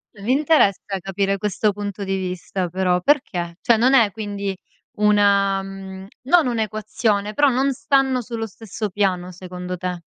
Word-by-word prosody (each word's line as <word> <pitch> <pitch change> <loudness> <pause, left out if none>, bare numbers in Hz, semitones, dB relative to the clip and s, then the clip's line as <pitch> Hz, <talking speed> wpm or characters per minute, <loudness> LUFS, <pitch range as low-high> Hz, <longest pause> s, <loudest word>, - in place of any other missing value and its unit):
Mi 210 +5 -1
interessa 285 -8 +3 0.2
capire 195 +1 -1
questo 210 +1 0
punto 205 0 -5
di 195 0 -1
vista, 185 0 -3
però. 180 0 +1
Perché 180 - 0
cioè, 235 -2 +4
non 250 +4 +3
è, 230 -6 +5
quindi, 200 -2 -4 0.4
una 200 -2 +3
mhmm, 190 0 -8 0.2
non 305 +3 +4
un'equazione, 215 -2 -1
però 290 +5 +4
non 270 +1 +2
stanno 260 +4 +1
sullo 230 -1 -5
stesso 220 0 -6
piano, 185 -2 -1
secondo 180 0 -7
te? 180 -1 -4
200 Hz, 150 wpm, -21 LUFS, 190-225 Hz, 0.4 s, è